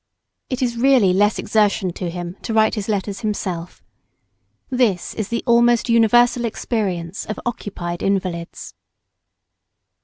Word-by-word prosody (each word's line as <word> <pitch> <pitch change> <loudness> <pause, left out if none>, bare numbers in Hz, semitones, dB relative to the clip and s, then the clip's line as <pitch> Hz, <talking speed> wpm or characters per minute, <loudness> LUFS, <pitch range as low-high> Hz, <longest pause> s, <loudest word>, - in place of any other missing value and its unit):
It 255 0 -2
is 235 -1 -1
really 245 -7 +4
less 205 +3 +3
exertion 200 -4 +1
to 180 0 -4
him 175 +1 -6
to 225 - -3
write 220 0 +4
his 210 -1 -4
letters 200 -1 -2
himself. 185 -6 -4 0.9
This 235 -8 +1
is 215 - -3
the 235 - -3
almost 235 0 +3
universal 240 +2 +4
experience 200 -6 -3
of 215 - -4
occupied 175 -7 -4
invalids. 185 -4 -3
210 Hz, 125 wpm, -20 LUFS, 185-235 Hz, 0.9 s, really